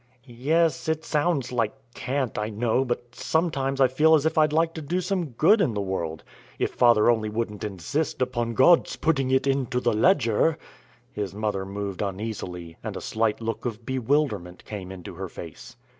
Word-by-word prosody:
"Yes, 155 +7 0
it 160 0 -1
sounds 150 -4 0
like 115 -2 0 0.2
cant, 130 -2 -2
I 105 0 -2
know, 115 +4 +1
but 120 -1 -4
sometimes 140 -5 -1
I 135 - +6
feel 155 +5 +4
as 150 -1 +1
if 160 - +1
I'd 155 -1 +4
like 165 +1 +2
to 160 - -6
do 170 +5 -1
some 185 -1 -1
good 195 - +4
in 125 - +1
the - - -1
world, 85 -5 -3 0.3
if - - -1
father 120 -3 +5
only 110 -2 +2
wouldn't 110 -1 -3
insist 105 - -2
upon 120 -2 -1
God's 165 +8 +5
putting 135 -5 +1
it 130 0 +2
into 135 -3 0
the 120 -2 +1
ledger." 120 - +3 0.6
His 100 -3 -4
mother 105 -3 -2
moved 100 -1 -4
uneasily, 95 -5 -5
and - - -4
a - - -4
slight 110 0 -1
look 115 -1 -3
of 115 -2 -5
bewilderment 125 -8 -1
came 95 -3 -7
into 90 -3 -8
her - - -6
face. - - -10
120 Hz, 180 wpm, -25 LUFS, 105-150 Hz, 0.6 s, I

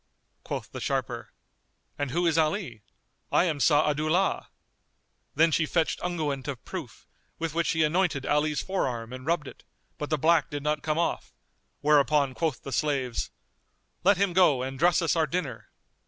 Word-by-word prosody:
Quoth - - -5
the - - -7
sharper, - - -2 0.6
"And 145 0 -2
who 175 +7 0
is 165 -3 +2
Ali? 155 - 0 0.5
I - - +4
am 160 -5 -1
Sa'adu'llah." 155 +5 +2 0.9
Then 160 +3 +4
she 155 0 +2
fetched 165 0 0
unguent 150 -7 -2
of 140 -4 -5
proof, - - -7 0.3
with 165 -2 -3
which 170 0 0
she 160 -1 +2
anointed 155 -3 +1
Ali's 150 +1 +1
forearm 125 -11 -2
and 130 +2 -8
rubbed 165 -4 0
it; - - -12 0.4
but 150 - -4
the 155 - +1
black 160 +1 +3
did 145 -1 -5
not 150 0 0
come 155 0 -1
off; 170 - -2 0.5
whereupon 145 -2 +3
quoth 155 -2 -2
the 135 - -6
slaves 135 -3 -1 0.7
"Let 200 +1 +5
him 195 -2 +1
go 160 -8 +4
and 135 0 -5
dress 175 +1 +4
us 165 - +2
our 160 -2 +2
dinner." 165 -4 -4
155 Hz, 165 wpm, -27 LUFS, 140-170 Hz, 0.9 s, Let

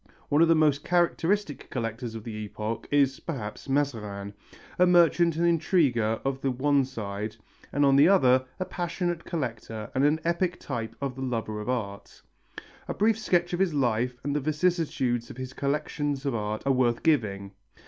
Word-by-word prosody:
One 145 +2 +3
of 165 - +6
the 165 - +5
most 150 -3 +3
characteristic 175 0 0
collectors 115 -1 -4
of 110 - -7
the 115 - -6
epoch 110 +1 -5
is, 140 -2 +2
perhaps, 130 -5 -6
Mazarin, 105 -8 -2 0.5
a 180 - +6
merchant 170 -1 +4
and 170 +1 +1
intriguer 150 - +2
on 135 -1 -1
the 135 - 0
one 135 +2 +2
side, 105 -4 -5 0.4
and 145 +1 +2
on 135 -1 +5
the 145 +3 +7
other 130 -9 +5 0.2
a 185 - -1
passionate 175 -1 -3
collector 115 - -4
and 130 - +1
an 150 +2 +3
epic 175 +1 0
type 115 -2 -5
of 140 -2 -2
the 135 - -7
lover 115 -4 -3
of 105 - -6
art. 100 -6 -4 0.6
A - - -3
brief 220 +1 +2
sketch 175 -4 +1
of 175 - -1
his 185 -5 +1
life 125 -2 0
and 145 +1 -2
of 145 - -1
the 155 - 0
vicissitudes 150 -8 0
of - - -10
his 130 0 -6
collections 145 0 -2
of 140 - 0
art 105 -1 -3
are 135 - +3
worth 120 -2 +1
giving. 100 -11 +1
135 Hz, 180 wpm, -27 LUFS, 115-165 Hz, 0.6 s, the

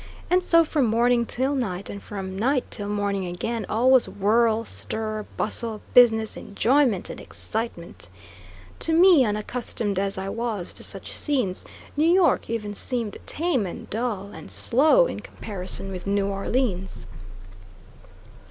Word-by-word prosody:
And 365 +1 +5
so, 335 -2 +5
from 295 -5 +1
morning 235 +1 +2
till 265 +3 -1
night, 200 -8 -3
and 200 - -7
from 190 -2 -6
night 255 +6 +1
till 205 -1 -4
morning 200 -2 -1
again, 215 +5 -3
all 240 +4 +3
was 260 -2 +5
whirl, 220 +2 +2
stir, 215 -1 -4
bustle, 220 0 0
business, 225 -3 +5
enjoyment, 235 0 +1
and - - -9
excitement. 220 -6 -6 0.7
To 325 - +1
me, 340 -4 +7
unaccustomed 215 -2 -2
as 195 0 -1
I 190 0 -4
was 220 -4 -3
to - - -9
such - - -4
scenes, 250 -11 -1 0.3
New 310 +3 +3
York 360 -7 +3
even 210 -3 -3
seemed 230 0 -4
tame 295 - 0
and 175 - -8
dull, 210 -3 -3
and - - -10
slow 310 - +4
in - - -4
comparison 195 -1 -5
with 185 0 -7
New 200 0 +1
Orleans. 195 -1 -2
225 Hz, 145 wpm, -24 LUFS, 200-255 Hz, 0.7 s, me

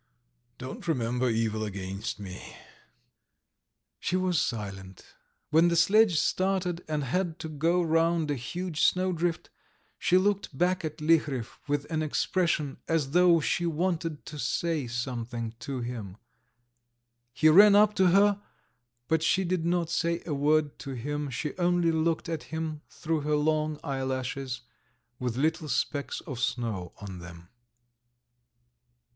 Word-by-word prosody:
"Don't 130 +6 -8
remember 125 -4 0
evil 110 -1 0
against 100 +1 -5
me... 95 -2 -9 0.7
." - - -55 0.7
She 180 - -1
was 185 -3 +2
silent. 95 -5 -5 0.5
When 160 +3 +5
the 170 - +2
sledge 190 0 +5
started, 185 0 0
and 150 -2 -1
had 170 +5 -1
to 160 - -6
go 165 +4 +1
round 165 -1 +2
a - - +2
huge 165 +6 -4
snowdrift, 175 -2 +1 0.5
she 180 - +3
looked 195 -6 0
back 180 +2 +1
at 155 -1 -4
Liharev 150 -7 +2 0.2
with 145 0 0
an 160 -1 0
expression 155 -2 0
as 155 -4 0
though 175 0 +5
she 170 +3 0
wanted 165 -1 -2
to 150 0 -8
say 160 -3 -1
something 120 -1 -4
to 130 +2 -4
him. 115 -5 -6 1.1
He 155 +5 +4
ran 200 +5 +8
up 210 0 +6
to 190 -2 +5
her, 200 +2 +4 0.7
but 160 0 +2
she 190 +4 +2
did 175 -2 -1
not 170 -1 0
say 170 0 0
a 155 - -2
word 150 +1 +1
to 135 - -6
him, 145 +4 -3
she 135 +4 -4
only 175 -1 +3
looked 160 +1 0
at 165 -1 -4
him 160 -1 -4
through 160 -1 -2
her 150 +1 +1
long 155 0 0
eyelashes 130 -2 -3 0.6
with 125 -2 -2
little 155 +2 0
specks 140 +3 -1
of 130 -4 -7
snow 115 -8 -2
on 95 -3 -8
them. 85 0 -11
155 Hz, 140 wpm, -28 LUFS, 125-170 Hz, 1.1 s, ran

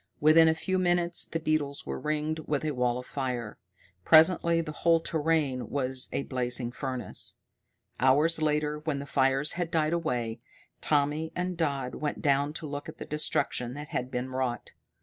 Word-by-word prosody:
Within 160 +2 +6
a 160 - +3
few 185 +3 -1
minutes 175 -1 +2
the 165 - -3
beetles 155 -2 -1
were - - -4
ringed 155 +1 -1
with 150 0 -1
a 155 - 0
wall 125 -2 0
of 125 - -7
fire. 125 -6 -4 0.4
Presently 165 - +5
the 160 -2 -3
whole 165 +2 +3
terrain 155 -5 0
was 130 -2 -2
a - - -1
blazing 125 -2 -2
furnace. 130 -1 -4 0.6
Hours 150 +6 +3
later, 150 0 +1
when 150 -2 -2
the 140 - -5
fires 135 +1 +2
had 175 -1 -2
died 160 -1 +1
away, 125 -9 -2 0.4
Tommy 150 +2 +1
and 180 0 -2
Dodd 140 -6 -1
went 150 - -3
down 140 0 +2
to 160 - -6
look 145 -1 -5
at - - -10
the - - -7
destruction 130 -4 -1
that 150 0 -7
had 125 - -3
been 125 +1 -3
wrought. 130 -3 -2
150 Hz, 170 wpm, -28 LUFS, 130-160 Hz, 0.6 s, Within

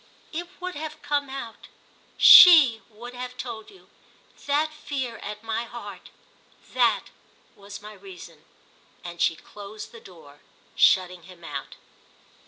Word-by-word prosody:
"It 345 +2 -6
would 365 0 -6
have 310 0 -8
come 285 -1 -2
out—_she 270 +2 +5
_would 240 +3 -11
have 250 0 -8
told 225 -4 -8
you. 390 -2 -20 0.6
That 300 +2 0
fear 270 -6 -6
at 210 +1 -9
my 225 +1 -4
heart—that 205 -5 -5 0.5
was 200 0 -12
my 210 0 -11
reason!" 185 -5 -14 0.6
And 170 -1 -9
she 165 - +2
closed 205 +5 -12
the 230 - -14
door, 155 -6 -17 0.4
shutting 180 -1 +2
him 175 -2 -16
out. 145 -4 -8
225 Hz, 120 wpm, -24 LUFS, 190-285 Hz, 0.6 s, out—_she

